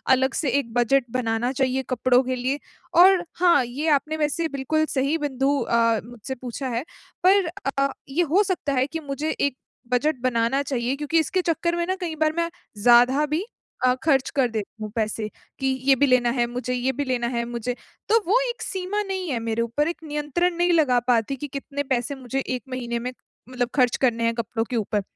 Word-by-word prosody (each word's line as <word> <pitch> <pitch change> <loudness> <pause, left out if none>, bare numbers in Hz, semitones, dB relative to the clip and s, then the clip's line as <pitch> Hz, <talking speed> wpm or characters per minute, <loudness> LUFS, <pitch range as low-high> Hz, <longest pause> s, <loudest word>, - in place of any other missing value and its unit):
अलग 265 +1 0
से 295 - 0
एक 230 -4 -6
बजट 245 +2 +3
बनाना 240 0 0
चाहिए 265 0 0
कपड़ों 255 0 +3
के 255 0 -2
लिए, 260 +4 -1 0.3
और 365 +1 +6
हाँ, 345 -6 +5
ये 280 +7 -4
आपने 310 +3 -5
वैसे 315 +2 0
बिल्कुल 310 +4 +1
सही 275 +4 +1
बिंदु 285 -1 0
अ, 230 -1 +2
मुझसे 240 +2 -7
पूछा 255 +2 -5
है। 240 - -2 0.4
पर 385 +1 +5 0.3
अ, 275 0 +3 0.2
ये 330 +6 +1
हो 405 +3 +6
सकता 360 -7 -1
है 260 +1 +2
कि 325 +2 -5
मुझे 295 +1 -3
एक 280 -2 0 0.4
बजट 300 +4 +2
बनाना 250 +2 +1
चाहिए, 255 -1 -1
क्योंकि 300 +3 +1
इसके 345 +4 0
चक्कर 340 0 0
में 345 0 0
ना 375 - 0
कई 330 -3 -3
बार 310 0 +3
मैं 335 0 +1 0.3
ज़्यादा 245 +4 +6
भी 310 +6 -2 0.4
अ, 250 - +5
खर्च 275 -5 +3
कर 265 -3 +3
देती 220 0 -5
हूँ 215 - -4
पैसे, 220 -1 -1 0.3
कि 270 - 0 0.2
ये 270 - +7
भी 285 - +3
लेना 250 -2 +3
है, 240 -1 +1
मुझे 250 +1 -3
ये 250 +1 0
भी 290 - 0
लेना 250 -2 0
है 235 -1 -1
मुझे। 240 +1 -3 0.4
तो 455 - +5
वो 440 +7 +4
एक 475 - -6
सीमा 385 +2 -2
नहीं 380 -3 -3
है 250 -5 -1
मेरे 225 0 -1
ऊपर, 235 +7 0
एक 340 - -3
नियंत्रण 300 +4 -1
नहीं 350 0 +3
लगा 285 -7 +4
पाती 245 +2 +2
कि 290 +3 -6
कितने 280 +1 -4
पैसे 265 0 -1
मुझे 265 0 -4
1 255 -2 -3
महीने 240 -2 -3
में 250 +2 -4 0.4
मतलब 245 -2 -1
खर्च 250 -4 +3
करने 235 -3 +2
है 230 - +2
कपड़ों 230 0 -2
के 250 - -2
ऊपर। 210 -2 0
265 Hz, 205 wpm, -24 LUFS, 245-310 Hz, 0.4 s, ये